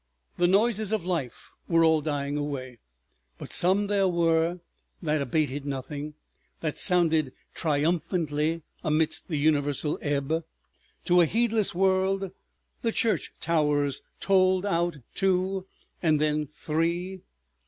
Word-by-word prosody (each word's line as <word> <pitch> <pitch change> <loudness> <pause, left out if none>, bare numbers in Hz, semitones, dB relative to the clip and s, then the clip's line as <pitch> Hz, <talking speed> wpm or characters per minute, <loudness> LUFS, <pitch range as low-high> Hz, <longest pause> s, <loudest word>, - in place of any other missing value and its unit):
The 175 - +4
noises 215 +2 +2
of 215 -6 -1
life 165 -9 -3 0.2
were 165 -1 +4
all 160 -1 +4
dying 145 -1 -2
away, 135 -4 -4 0.6
but - - -8
some 190 +4 +3
there 200 -1 +2
were 170 0 +2 0.4
that 155 -3 0
abated 145 0 -1
nothing, 145 +2 -5 0.5
that 155 -2 -3
sounded 160 -7 +2 0.2
triumphantly 160 0 0 0.2
amidst 155 -1 0
the 155 - -2
universal 145 0 +1
ebb. 145 +3 -1 0.6
To 180 0 +5
a - - +6
heedless 225 -1 +1
world 190 0 +1 0.5
the 230 - +1
church 225 -1 0
towers 150 -4 +1 0.2
tolled 185 -1 +3
out 175 -4 0 0.2
two 190 0 0 0.3
and 155 -3 +3
then 150 0 +1
three. 170 +5 -2
165 Hz, 120 wpm, -27 LUFS, 150-185 Hz, 0.6 s, a